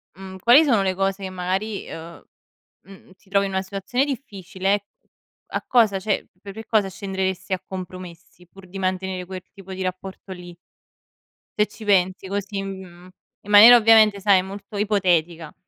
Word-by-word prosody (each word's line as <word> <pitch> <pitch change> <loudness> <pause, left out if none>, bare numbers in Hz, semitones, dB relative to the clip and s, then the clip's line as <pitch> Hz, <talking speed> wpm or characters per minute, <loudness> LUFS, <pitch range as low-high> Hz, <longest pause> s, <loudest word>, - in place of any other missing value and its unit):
mhmm, 190 0 -10
quali 245 - +6
sono 225 -8 +2
le 190 -1 0
cose 195 +1 -2
che 190 - -4
magari 190 +3 -3
ehm, 165 +1 -10 0.6
mhmm, 195 -1 -17
ti 195 - -27
trovi 200 0 +2
in 195 - -7
una 190 - -1
situazione 195 +7 -2
difficile, 200 -6 -3 0.6
a - - -4
cosa 225 -6 +3
cioè 205 +1 -2
per 200 -1 -10
che 220 +1 -9
cosa 210 -3 +2
scenderesti 190 -1 -4
a 185 - -1
compromessi 185 -1 -10
pur 190 +1 -16
di 195 +2 -9
mantenere 185 -1 -3
quel 185 0 -8
tipo 195 -1 -11
di 190 - -7
rapporto 185 +1 -7
lì? 175 -1 -11 1.0
Se 210 - +3
ci 215 +1 -13
pensi 190 -1 +1
così, 200 0 -4
mhmm, 185 -2 -10 0.3
in 205 - -9
maniera 220 +4 +10
ovviamente 220 -2 +5
sai 195 -1 +4
molto 200 +2 -10
ipotetica. 175 -6 0
195 Hz, 165 wpm, -22 LUFS, 185-205 Hz, 1.0 s, maniera